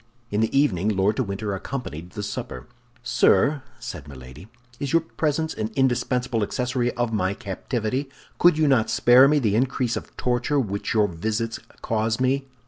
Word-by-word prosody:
In 105 Hz, +1 st, +1 dB
the 115 Hz, +5 st, +2 dB
evening 105 Hz, -8 st, +2 dB
Lord 105 Hz, +1 st, +1 dB
de 130 Hz, -, +2 dB
Winter 100 Hz, 0 st, -3 dB
accompanied 95 Hz, -, -6 dB
the 105 Hz, -, -5 dB
supper. 65 Hz, -11 st, -5 dB, 0.4 s
"Sir," 145 Hz, -1 st, +3 dB, 0.2 s
said -, -, -7 dB
Milady, 65 Hz, +5 st, -11 dB, 0.3 s
"is 140 Hz, 0 st, -3 dB
your 165 Hz, -1 st, +4 dB
presence 160 Hz, 0 st, -1 dB
an 110 Hz, 0 st, -3 dB
indispensable 125 Hz, -2 st, +1 dB
accessory 125 Hz, +3 st, -1 dB
of 120 Hz, -2 st, -1 dB
my 100 Hz, -2 st, 0 dB
captivity? 115 Hz, +7 st, -3 dB, 0.3 s
Could 175 Hz, -3 st, +5 dB
you 155 Hz, -1 st, +3 dB
not 130 Hz, -5 st, +3 dB
spare 125 Hz, +3 st, +6 dB
me 150 Hz, +1 st, +3 dB
the 110 Hz, -7 st, +1 dB
increase 125 Hz, 0 st, 0 dB
of -, -, -8 dB
torture 125 Hz, +4 st, 0 dB
which 100 Hz, -3 st, -2 dB
your 105 Hz, -1 st, +4 dB
visits 110 Hz, +6 st, -3 dB, 0.2 s
cause 110 Hz, 0 st, 0 dB
me?" 135 Hz, +1 st, +1 dB
120 Hz, 165 wpm, -24 LUFS, 105-135 Hz, 0.4 s, spare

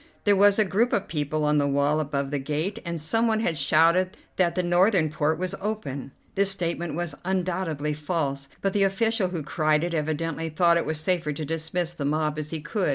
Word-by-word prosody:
There 205 Hz, -1 st, +4 dB
was 200 Hz, +1 st, +5 dB
a 215 Hz, -, +4 dB
group 215 Hz, +6 st, +1 dB
of 200 Hz, -, 0 dB
people 150 Hz, 0 st, -2 dB
on 150 Hz, 0 st, +3 dB
the 140 Hz, -, +1 dB
wall 140 Hz, +2 st, +2 dB
above 140 Hz, -2 st, -2 dB
the 145 Hz, -, -1 dB
gate, 155 Hz, +8 st, -2 dB
and 170 Hz, -1 st, -4 dB
someone 220 Hz, +8 st, +1 dB
had 170 Hz, -7 st, 0 dB
shouted 165 Hz, +6 st, +3 dB, 0.2 s
that 175 Hz, -2 st, +1 dB
the 180 Hz, -, +1 dB
northern 175 Hz, -2 st, +3 dB
port 150 Hz, +1 st, 0 dB
was 185 Hz, +1 st, -3 dB
open. 195 Hz, -11 st, -4 dB, 0.2 s
This 200 Hz, -1 st, +3 dB
statement 175 Hz, -3 st, -2 dB
was 175 Hz, -2 st, -3 dB
undoubtedly 180 Hz, -5 st, -1 dB
false, 145 Hz, -3 st, -3 dB
but 195 Hz, -1 st, 0 dB
the 205 Hz, -, +1 dB
official 195 Hz, +1 st, +2 dB
who 175 Hz, -4 st, -4 dB
cried 155 Hz, +1 st, +1 dB
it 175 Hz, 0 st, -2 dB
evidently 160 Hz, +1 st, -2 dB
thought 170 Hz, +2 st, +3 dB
it 170 Hz, -, -1 dB
was 155 Hz, -1 st, -1 dB
safer 170 Hz, -2 st, 0 dB
to 155 Hz, +2 st, -5 dB
dismiss 165 Hz, +2 st, -2 dB
the 145 Hz, -5 st, -4 dB
mob 155 Hz, +1 st, 0 dB
as 150 Hz, 0 st, -5 dB
he 160 Hz, -1 st, -4 dB
could. 185 Hz, +4 st, -1 dB
165 Hz, 210 wpm, -25 LUFS, 150-185 Hz, 0.2 s, was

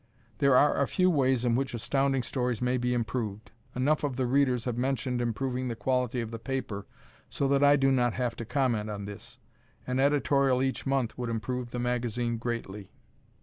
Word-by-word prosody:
There 140 Hz, -2 st, +5 dB
are 145 Hz, 0 st, +4 dB
a 140 Hz, -, +2 dB
few 185 Hz, -1 st, +2 dB
ways 130 Hz, -5 st, +2 dB
in 120 Hz, -, +2 dB
which 130 Hz, -1 st, -1 dB
Astounding 135 Hz, +2 st, 0 dB
Stories 125 Hz, -1 st, -1 dB
may 125 Hz, +1 st, +1 dB
be 125 Hz, 0 st, -1 dB
improved. 115 Hz, -3 st, -3 dB, 0.2 s
Enough 145 Hz, +5 st, +1 dB
of 140 Hz, -3 st, -1 dB
the 130 Hz, 0 st, 0 dB
readers 130 Hz, -2 st, +2 dB
have 125 Hz, -2 st, -1 dB
mentioned 125 Hz, -1 st, -1 dB
improving 125 Hz, +2 st, -2 dB
the 115 Hz, -, -3 dB
quality 125 Hz, 0 st, 0 dB
of 115 Hz, -1 st, -5 dB
the 115 Hz, -, -6 dB
paper 115 Hz, -6 st, -4 dB, 0.4 s
so 140 Hz, -, -1 dB
that 140 Hz, 0 st, +3 dB
I 145 Hz, 0 st, +7 dB
do 135 Hz, -1 st, +3 dB
not 120 Hz, -3 st, +2 dB
have 120 Hz, -3 st, -2 dB
to -, -, -4 dB
comment 115 Hz, -5 st, 0 dB
on 100 Hz, -1 st, -5 dB
this. 110 Hz, +4 st, -9 dB, 0.5 s
An 125 Hz, +1 st, -1 dB
editorial 140 Hz, -2 st, +3 dB
each 135 Hz, +1 st, -2 dB
month 135 Hz, -3 st, -1 dB
would 120 Hz, -1 st, -2 dB
improve 120 Hz, +2 st, -3 dB
the 125 Hz, -, -5 dB
magazine 120 Hz, -1 st, -1 dB
greatly. 110 Hz, -4 st, -5 dB
125 Hz, 190 wpm, -29 LUFS, 115-135 Hz, 0.5 s, I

